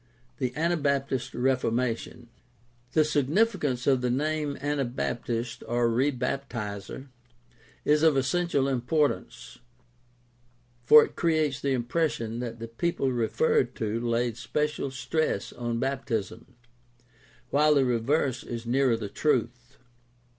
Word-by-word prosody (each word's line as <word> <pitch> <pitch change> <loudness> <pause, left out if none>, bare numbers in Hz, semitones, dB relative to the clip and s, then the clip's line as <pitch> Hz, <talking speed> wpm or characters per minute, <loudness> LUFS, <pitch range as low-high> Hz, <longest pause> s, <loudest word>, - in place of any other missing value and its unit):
THE 130 -3 -1
ANABAPTIST 140 -5 0
REFORMATION 125 -1 -1 0.7
The 155 -1 +4
significance 150 - +1
of 135 -2 +3
the 125 - 0
name 150 +2 -1
Anabaptist 125 -4 -2
or 120 +1 +1
Rebaptiser 125 -2 -2 0.8
is 150 0 +4
of 160 -3 +4
essential 140 +1 +1
importance, 140 +3 -1 1.2
for 150 +5 +8
it - - -14
creates 155 -5 +1
the 140 -1 0
impression 120 -3 -1
that 120 -2 -5
the 115 0 -7
people 135 +3 -1
referred 435 - +1
to 110 0 -2
laid 120 -1 -1
special 140 +5 -2
stress 130 -2 -2
on 120 -1 -3
baptism, 130 -3 -3 1.0
while 150 +1 +4
the 135 -2 +4
reverse 125 +2 0
is 120 -1 -6
nearer 125 0 +2
the 110 -2 -5
truth. 125 +1 -1
130 Hz, 110 wpm, -27 LUFS, 120-150 Hz, 1.2 s, for